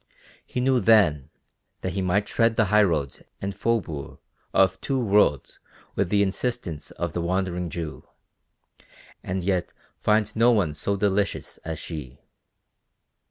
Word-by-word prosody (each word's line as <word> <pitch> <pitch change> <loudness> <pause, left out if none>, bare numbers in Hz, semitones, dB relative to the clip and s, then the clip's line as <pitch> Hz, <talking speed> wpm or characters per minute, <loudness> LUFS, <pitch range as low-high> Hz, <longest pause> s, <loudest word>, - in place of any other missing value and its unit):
He - - -4
knew 130 0 +3
then 85 - +4 0.5
that - - -3
he 100 - -1
might 95 +3 +1
tread 115 -1 +2
the 110 - +3
highroads 85 -10 +2 0.2
and 100 +1 -3
faubourgs 100 -9 -2 0.3
of 95 0 +3
two 135 -2 -1
worlds 100 - +2 0.3
with 100 - 0
the 100 +1 +3
insistence 100 - -3
of 85 -3 -4
the 85 - -2
Wandering 90 0 -1
Jew, 80 -1 -6 1.1
and 95 0 -3
yet 90 -2 -1 0.3
find 105 0 +1
no 115 +2 +5
one 100 -10 +2
so 100 +6 -1
delicious 100 0 -1
as 80 -1 -6
she. 75 -5 -7
95 Hz, 135 wpm, -25 LUFS, 85-105 Hz, 1.1 s, no